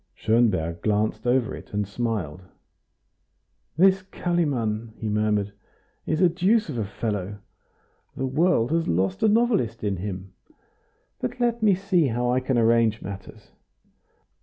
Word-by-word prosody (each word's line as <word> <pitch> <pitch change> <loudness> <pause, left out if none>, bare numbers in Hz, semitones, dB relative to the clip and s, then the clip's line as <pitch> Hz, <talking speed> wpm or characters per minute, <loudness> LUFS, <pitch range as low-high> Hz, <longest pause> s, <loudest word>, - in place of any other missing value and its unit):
Schonberg 95 -8 +1
glanced 110 +3 0
over 125 -1 +1
it, - - -10
and 105 -1 -1
smiled. 100 -7 -3 1.4
"This 190 +2 +5
Kalimann," 130 - -2
he 110 - -4
murmured, 105 -1 0 0.5
"is 155 +2 0
a 180 - +7
deuce 190 +6 +2
of 120 - -3
a 110 - -1
fellow. 105 -1 -4 0.8
The 135 - -1
world 145 -2 +2
has 165 0 +1
lost 95 +2 0
a - - +4
novelist 210 - +1
in 100 -2 -1
him. 95 0 -6 0.9
But 125 - -4
let 235 -1 +1
me 205 -3 +4
see 185 -5 +1
how 120 0 0
I 125 - +2
can 130 -1 -1
arrange 115 -1 +3
matters. 100 -1 -9
115 Hz, 135 wpm, -25 LUFS, 105-170 Hz, 1.4 s, a